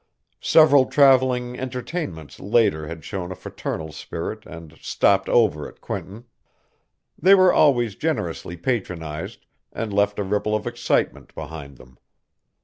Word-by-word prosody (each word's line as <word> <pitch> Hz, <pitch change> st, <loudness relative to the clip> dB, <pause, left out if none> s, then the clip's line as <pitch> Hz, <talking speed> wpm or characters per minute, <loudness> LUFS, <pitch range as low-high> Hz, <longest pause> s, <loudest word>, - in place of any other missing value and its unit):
Several 145 Hz, -5 st, +5 dB
travelling 130 Hz, -3 st, +3 dB
entertainments 125 Hz, -, -5 dB
later 95 Hz, -7 st, +1 dB
had 80 Hz, -1 st, -8 dB
shown 95 Hz, -3 st, -5 dB
a -, -, -5 dB
fraternal 80 Hz, -3 st, -6 dB
spirit 85 Hz, +7 st, -6 dB
and 85 Hz, -3 st, -11 dB
"stopped 95 Hz, -1 st, +2 dB
over" 100 Hz, -11 st, +2 dB
at -, -, -16 dB
Quinton. 105 Hz, +6 st, -7 dB, 1.0 s
They 190 Hz, +5 st, +7 dB
were 185 Hz, -1 st, +5 dB
always 120 Hz, -7 st, +3 dB
generously 85 Hz, -2 st, -3 dB
patronized 85 Hz, -7 st, -4 dB, 0.3 s
and 110 Hz, -3 st, -4 dB
left 100 Hz, 0 st, +1 dB
a 105 Hz, -, -1 dB
ripple 105 Hz, +2 st, -1 dB
of 105 Hz, -, -3 dB
excitement -, -, -1 dB
behind 70 Hz, -4 st, -8 dB
them. 65 Hz, 0 st, -18 dB
105 Hz, 130 wpm, -23 LUFS, 80-125 Hz, 1.0 s, They